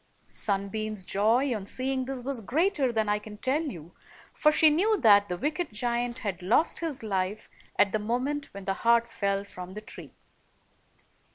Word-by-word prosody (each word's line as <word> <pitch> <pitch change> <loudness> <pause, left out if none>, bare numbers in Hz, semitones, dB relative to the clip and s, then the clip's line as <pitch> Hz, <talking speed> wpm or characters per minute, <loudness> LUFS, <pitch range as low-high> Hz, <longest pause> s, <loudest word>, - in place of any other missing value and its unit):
Sunbeam's 205 0 -2
joy 235 +8 +2
on 210 - -5
seeing 260 +5 -2
this 260 -1 -5
was 265 -2 -3
greater 285 - +1
than 220 -2 0
I 210 0 +1
can 210 0 -11
tell 265 +7 +1
you, 175 - -7 0.4
for 305 - +4
she 310 0 +6
knew 410 +8 +2
that 205 -5 +6
the 180 - -2
wicked 305 - -2
giant 240 +2 -1
had 200 -7 -4
lost 225 - +2
his 305 -7 -3
life 195 0 -2 0.3
at 200 - +4
the 215 - 0
moment 255 +7 -2
when 200 -1 -9
the 195 - 0
heart 235 0 +4
fell 200 -4 -1
from 185 -2 -9
the 210 - -6
tree. 215 - -11
230 Hz, 175 wpm, -28 LUFS, 200-270 Hz, 0.4 s, she